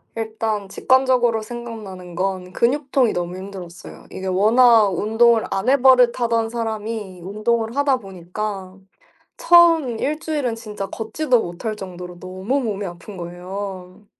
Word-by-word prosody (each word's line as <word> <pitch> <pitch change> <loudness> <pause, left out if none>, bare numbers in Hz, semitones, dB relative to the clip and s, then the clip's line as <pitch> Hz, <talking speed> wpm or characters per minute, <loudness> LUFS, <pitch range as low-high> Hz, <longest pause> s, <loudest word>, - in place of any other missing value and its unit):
일단 220 -2 -3
직관적으로 250 0 +2
생각나는 215 -6 -8
건 185 0 -2
근육통이 265 +2 +1
너무 175 +1 -3
힘들었어요. 185 -3 -10
이게 190 - -6
워낙 220 +3 +5
운동을 225 +4 +3
안 195 - 0
해 275 - +5
버릇하던 240 -3 +4
사람이 220 -4 -4
운동을 220 +4 -1
하다 285 -2 +3
보니까 190 -1 -6 0.6
처음 335 - +5
일주일은 300 -4 -2
진짜 210 -3 -6
걷지도 245 +5 0
못할 175 +6 -5
정도로 180 -3 -8
너무 190 +9 -2
몸이 210 -5 -3
아픈 175 +3 -9
거예요. 185 +2 -7
215 Hz, 305 characters per minute, -21 LUFS, 190-240 Hz, 0.6 s, 워낙